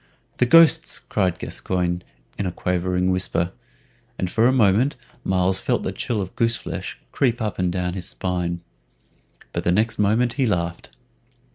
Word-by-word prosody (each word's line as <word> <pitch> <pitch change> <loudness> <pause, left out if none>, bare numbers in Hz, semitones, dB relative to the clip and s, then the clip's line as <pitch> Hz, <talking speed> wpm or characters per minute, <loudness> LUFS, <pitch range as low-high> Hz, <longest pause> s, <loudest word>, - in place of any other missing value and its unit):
"The 125 - +3
ghosts!" 165 +3 +6
cried 95 -5 -1
Gascoyne, 90 -1 -2 0.3
in 100 - -2
a - - -2
quavering 90 +1 0
whisper, 90 -1 +1 0.7
and 90 -1 -2
for 115 +1 +4
a - - +4
moment 120 +2 +3 0.3
Myles 95 0 +1
felt - - 0
the - - -2
chill 110 -5 -2
of 95 - -10
goose 115 0 +2
flesh - - -6
creep 120 -3 +1
up 105 -4 -3
and 90 -1 +1
down 90 0 -2
his 90 -1 -5
spine. 90 -2 -2 0.9
But - - -2
the 85 - +2
next 110 +5 +1
moment 110 +4 +2
he 130 0 +1
laughed. 85 - -2
95 Hz, 160 wpm, -23 LUFS, 90-115 Hz, 0.9 s, ghosts